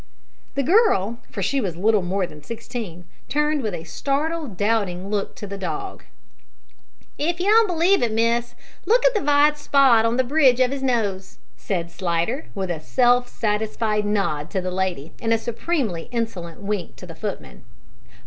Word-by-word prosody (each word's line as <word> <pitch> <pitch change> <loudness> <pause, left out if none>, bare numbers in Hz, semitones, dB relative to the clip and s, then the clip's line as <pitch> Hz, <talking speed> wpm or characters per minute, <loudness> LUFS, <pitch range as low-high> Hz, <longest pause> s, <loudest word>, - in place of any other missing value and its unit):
The 275 - +1
girl 270 - +3
for - - -4
she 275 -1 +1
was 180 -7 -3
little 210 +2 +3
more 185 +2 -1
than 150 -3 -12
sixteen 220 - -7 0.2
turned 300 0 +1
with 215 -6 -2
a 165 - -7
startled, 280 - -2
doubting 200 -3 0
look 205 -2 -2
to - - -7
the 200 0 -7
dog. 390 - -5 1.1
"If 340 +4 0
you 360 - -1
don't 440 +2 +6
b'lieve 355 +2 +3
it, 235 -2 +1
miss, 235 +2 +1 0.3
look 485 +3 +4
at - - +5
the 425 - 0
vite 295 +1 +3
spot 270 -6 +5
on 230 +1 +1
the 260 - +3
bridge 260 -2 +4
of 255 +1 +3
'is 275 - -4
nose," 205 -7 -1 0.2
said 170 -4 -3
Slidder, 175 - -2
with 190 -2 -2
a 165 - -3
self 245 +7 +3
satisfied 215 -1 -1
nod 195 -7 -1
to 190 - -1
the 185 0 -3
lady 180 -5 -2
and 225 - 0
a 230 - +4
supremely 230 - -2
insolent 195 -9 -4
wink 200 -4 -3
to - - -11
the 170 - -9
footman. 160 - -6
225 Hz, 175 wpm, -23 LUFS, 190-275 Hz, 1.1 s, don't